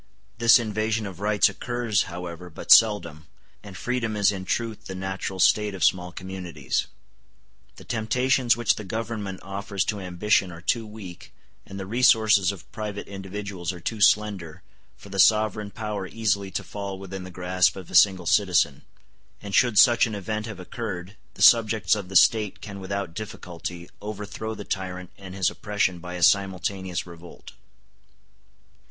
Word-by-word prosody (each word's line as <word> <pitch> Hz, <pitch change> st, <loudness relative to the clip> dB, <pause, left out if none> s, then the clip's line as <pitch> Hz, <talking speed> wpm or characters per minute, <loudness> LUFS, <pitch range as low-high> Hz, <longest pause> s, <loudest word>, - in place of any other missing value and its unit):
This 115 Hz, 0 st, +7 dB
invasion 110 Hz, -1 st, -1 dB
of 95 Hz, -3 st, -8 dB
rights 105 Hz, 0 st, +3 dB
occurs, 120 Hz, -4 st, -1 dB
however, 90 Hz, 0 st, -7 dB
but 80 Hz, -, -5 dB
seldom, 85 Hz, -9 st, +5 dB, 0.3 s
and 100 Hz, -2 st, -11 dB
freedom 115 Hz, 0 st, -2 dB
is 100 Hz, -1 st, +3 dB
in 95 Hz, -2 st, -6 dB
truth 110 Hz, +1 st, -3 dB
the 95 Hz, -, -6 dB
natural 95 Hz, 0 st, -4 dB
state 105 Hz, +1 st, +3 dB
of 95 Hz, -, -3 dB
small 90 Hz, -1 st, +2 dB
communities. 90 Hz, -7 st, -4 dB, 0.9 s
The -, -, -13 dB
temptations 125 Hz, +2 st, +1 dB
which 120 Hz, -3 st, +2 dB
the 105 Hz, -, -6 dB
Government 105 Hz, -2 st, -5 dB
offers 100 Hz, 0 st, -3 dB
to 105 Hz, -2 st, -2 dB
ambition 95 Hz, +1 st, +1 dB
are 85 Hz, -, -10 dB
too 115 Hz, +6 st, -1 dB
weak, 95 Hz, -5 st, -10 dB, 0.4 s
and 100 Hz, -, -8 dB
the 95 Hz, -, -5 dB
resources 110 Hz, -3 st, +4 dB
of 100 Hz, -, -12 dB
private 105 Hz, -3 st, -5 dB
individuals 95 Hz, -2 st, -5 dB
are 90 Hz, -, -9 dB
too 110 Hz, +5 st, -4 dB
slender, 100 Hz, -6 st, +2 dB, 0.3 s
for 100 Hz, -, -14 dB
the 100 Hz, 0 st, -5 dB
sovereign 105 Hz, 0 st, +3 dB
power 105 Hz, -2 st, -5 dB
easily 100 Hz, -2 st, -1 dB
to -, -, -4 dB
fall 100 Hz, -2 st, -6 dB
within 95 Hz, -1 st, -7 dB
the 95 Hz, -, -9 dB
grasp 90 Hz, 0 st, +1 dB
of 95 Hz, -3 st, -10 dB
a -, -, -11 dB
single 95 Hz, -1 st, +5 dB
citizen; 85 Hz, -7 st, +2 dB, 0.6 s
and 100 Hz, -1 st, -8 dB
should 120 Hz, 0 st, +3 dB
such 120 Hz, +1 st, +6 dB
an 110 Hz, -, -5 dB
event 105 Hz, +3 st, -4 dB
have 105 Hz, -4 st, -8 dB
occurred, 95 Hz, -1 st, -6 dB, 0.2 s
the -, -, -1 dB
subjects 110 Hz, -2 st, +5 dB
of 100 Hz, -4 st, -3 dB
the 95 Hz, -, -8 dB
State 105 Hz, +1 st, +4 dB
can 100 Hz, -2 st, -8 dB
without 95 Hz, -2 st, -4 dB
difficulty 85 Hz, -3 st, -7 dB
overthrow 105 Hz, +1 st, -6 dB
the 105 Hz, -, -8 dB
tyrant 90 Hz, -1 st, -5 dB
and 95 Hz, -1 st, -9 dB
his 95 Hz, -1 st, +1 dB
oppression 105 Hz, -5 st, -1 dB
by 90 Hz, +1 st, -7 dB
a 90 Hz, -, -3 dB
simultaneous 95 Hz, -1 st, +1 dB
effort. 85 Hz, 0 st, -13 dB
100 Hz, 160 wpm, -25 LUFS, 90-110 Hz, 0.9 s, This